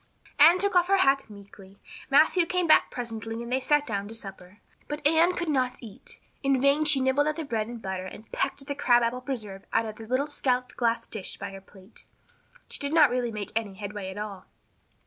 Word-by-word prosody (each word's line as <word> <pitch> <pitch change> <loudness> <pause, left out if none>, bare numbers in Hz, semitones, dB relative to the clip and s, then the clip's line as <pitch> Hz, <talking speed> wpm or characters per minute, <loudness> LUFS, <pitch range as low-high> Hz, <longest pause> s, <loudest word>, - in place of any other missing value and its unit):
Anne 330 +5 +8
took 400 +1 0
off 355 0 +4
her 395 +1 +4
hat 275 -8 +2
meekly. 200 -1 -14 0.3
Matthew 315 +5 +4
came 360 0 0
back 315 - +5
presently 225 -1 -5
and 235 - -8
they 260 - +2
sat 295 +2 +2
down 205 -4 -3
to 225 - -9
supper. 195 -2 -10 0.3
But 295 0 -6
Anne 325 +4 +4
could 345 -1 -3
not 255 -4 0
eat. 365 - -12 0.2
In 275 -2 +2
vain 280 +3 +3
she 295 -2 +5
nibbled 265 +3 +2
at 305 - 0
the 325 - -4
bread 225 -6 -2
and 235 0 -7
butter 190 -2 -5
and 220 +4 -12
pecked 275 - -2
at - - -21
the 285 - -2
crab 240 -4 +3
apple 240 +2 -1
preserve 215 -7 -6
out 225 0 +1
of 215 -1 -7
the 225 - -10
little 255 +4 +1
scalloped 255 -4 -1
glass 230 -1 0
dish 210 -4 -6
by 200 0 -6
her 195 0 -10
plate. 190 +1 -17 0.6
She - - -1
did 285 +2 -2
not 300 -5 +6
really 245 -1 -1
make 210 -2 -6
any 215 -4 -2
headway 205 -1 -6
at 190 - -8
all. 205 -2 -7
245 Hz, 225 wpm, -27 LUFS, 210-290 Hz, 0.6 s, Anne